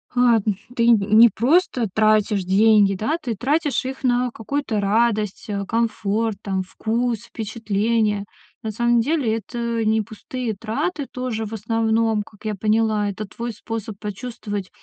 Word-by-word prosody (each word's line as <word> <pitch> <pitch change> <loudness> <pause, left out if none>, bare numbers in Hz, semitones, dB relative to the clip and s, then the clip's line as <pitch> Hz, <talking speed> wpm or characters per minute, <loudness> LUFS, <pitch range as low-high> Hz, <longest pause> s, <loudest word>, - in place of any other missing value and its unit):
Ладно, 230 -5 +3 0.2
ты 235 -1 +2
нь 235 - +7 0.2
не 235 0 +9
просто 250 - +2
тратишь 215 -2 +2
деньги, 200 +1 +4
да, 220 - -1
ты 235 -4 -3
тратишь 290 +6 0
их 265 +1 -6
на 250 0 +2
какую-то 230 -1 -2
радость, 210 0 +1
э, 200 -1 -2
комфорт, 220 -1 -1
там, 190 -2 -1
вкус, 230 +4 -1
впечатления. 215 -1 -1 0.4
На 220 - -4
самом 240 +2 +2
деле 255 -4 +1
это 235 +1 -3
не 220 0 +3
пустые 220 +2 -5
траты 235 - -3
тоже, 250 -3 -3
в 215 - -8
основном, 225 0 +1
как 215 -1 -19
я 215 - -1
поняла. 215 0 +1
Это 200 +2 -5
твой 235 +5 -5
способ 220 -1 -6
почувствовать, 205 -2 -5
225 Hz, 145 wpm, -22 LUFS, 210-235 Hz, 0.4 s, не